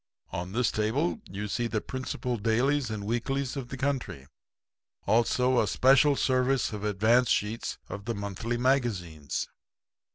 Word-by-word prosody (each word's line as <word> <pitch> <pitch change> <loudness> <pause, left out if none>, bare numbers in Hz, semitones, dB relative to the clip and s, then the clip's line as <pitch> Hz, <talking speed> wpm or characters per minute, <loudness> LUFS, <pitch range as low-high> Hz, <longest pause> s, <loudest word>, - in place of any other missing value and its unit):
On 90 +1 -4
this 120 -1 +2
table 135 - 0
you 105 +2 -4
see 120 +3 -1
the 110 -2 -1
principal 130 0 -3
dailies 120 +5 +1
and 110 -2 -4
weeklies 130 +4 -1
of 135 -3 -4
the 130 - -7
country. 130 - -2 0.8
Also 125 +2 +3
a 105 - 0
special 135 +6 +5
service 130 -2 +1
of 105 -1 -5
advance 110 +4 +3
sheets 105 +3 -1
of 100 +1 -7
the 115 0 -2
monthly 100 +4 -3
magazines.' 110 - 0
120 Hz, 140 wpm, -28 LUFS, 105-130 Hz, 0.8 s, special